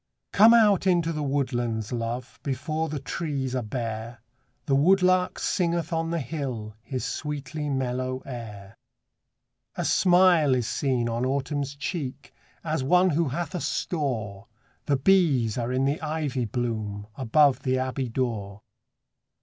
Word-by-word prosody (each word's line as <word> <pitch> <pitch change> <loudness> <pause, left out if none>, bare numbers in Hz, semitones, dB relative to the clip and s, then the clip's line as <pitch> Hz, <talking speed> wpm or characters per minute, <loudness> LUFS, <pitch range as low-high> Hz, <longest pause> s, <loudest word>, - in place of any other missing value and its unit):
COME 225 +3 +8
out 205 -5 +4
into 170 -2 +2
the 155 - -3
woodlands, 120 -6 -1
love, 120 +1 -4
Before 155 +3 -2
the 150 - -3
trees 140 -3 -3
are 130 - 0
bare; 115 0 -5 0.5
The 140 - 0
woodlark 185 +4 +3
singeth 170 -2 -1
on 165 0 -1
the 170 0 -1
hill 125 -6 -4
His 130 +2 -4
sweetly 150 0 -4
mellow 130 -1 -2
air. 105 -6 -8 1.0
A - - -2
smile 175 -6 +4
is 125 -2 0
seen 125 -1 0
on 115 +1 -2
Autumn's 140 +1 -2
cheek, 140 -3 -5 0.3
As 155 -4 -1
one 180 +6 +4
who 160 +1 +1
hath 170 +7 -4
a 180 - -3
store; 115 - -3 0.4
The 140 -2 +3
bees 140 - +3
are 120 +1 -2
in 130 +1 +1
the 140 +3 0
ivy 150 -5 -2
bloom, 110 -4 -3
Above 140 +2 +3
the 130 -1 0
abbey 130 0 -2
door. 110 -5 -3
135 Hz, 140 wpm, -26 LUFS, 120-160 Hz, 1.0 s, COME